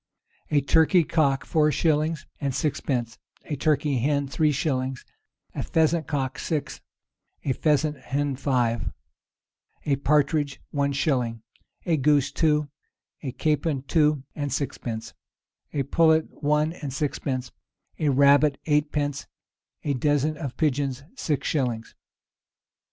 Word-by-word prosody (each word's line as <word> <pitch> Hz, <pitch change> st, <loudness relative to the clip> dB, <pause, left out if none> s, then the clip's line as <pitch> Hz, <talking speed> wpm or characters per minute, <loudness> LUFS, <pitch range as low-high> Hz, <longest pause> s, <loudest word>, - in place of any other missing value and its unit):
A 145 Hz, -2 st, +3 dB
turkey 160 Hz, +5 st, +4 dB
cock 145 Hz, -4 st, +1 dB
four 150 Hz, -1 st, +3 dB
shillings 155 Hz, 0 st, +1 dB
and 140 Hz, -3 st, -2 dB
sixpence, 125 Hz, -6 st, -1 dB, 0.3 s
a 150 Hz, -, -3 dB
turkey 145 Hz, -2 st, +1 dB
hen 140 Hz, +2 st, +1 dB
three 155 Hz, +2 st, +2 dB
shillings, 130 Hz, -3 st, -2 dB, 0.5 s
a -, -, -3 dB
pheasant 160 Hz, -1 st, +1 dB
cock 135 Hz, -3 st, -2 dB
six, 155 Hz, -4 st, -3 dB, 0.6 s
a 135 Hz, -, +2 dB
pheasant 150 Hz, +1 st, +1 dB
hen 140 Hz, 0 st, -1 dB
five, 125 Hz, -4 st, 0 dB, 1.0 s
a 140 Hz, -2 st, +2 dB
partridge 145 Hz, 0 st, +1 dB
one 140 Hz, -1 st, +1 dB
shilling, 125 Hz, -6 st, 0 dB, 0.4 s
a 165 Hz, -3 st, +2 dB
goose 145 Hz, 0 st, +3 dB
two, 150 Hz, -2 st, +2 dB, 0.5 s
a 135 Hz, -, -4 dB
capon 150 Hz, -1 st, 0 dB
two 150 Hz, 0 st, +2 dB
and 145 Hz, -2 st, -3 dB
sixpence, 115 Hz, -5 st, -4 dB, 0.6 s
a 140 Hz, -, -1 dB
pullet 160 Hz, +3 st, +2 dB
one 150 Hz, +2 st, +2 dB
and 145 Hz, -5 st, -6 dB
sixpence, 130 Hz, -3 st, -2 dB, 0.5 s
a 155 Hz, -, +2 dB
rabbit 140 Hz, +1 st, +5 dB
eightpence, 150 Hz, -2 st, 0 dB, 0.6 s
a 145 Hz, -, 0 dB
dozen 145 Hz, +3 st, +1 dB
of 140 Hz, -5 st, -6 dB
pigeons 140 Hz, -3 st, 0 dB
six 150 Hz, -, -1 dB
shillings. 120 Hz, -6 st, -1 dB
145 Hz, 120 wpm, -25 LUFS, 135-155 Hz, 1.0 s, rabbit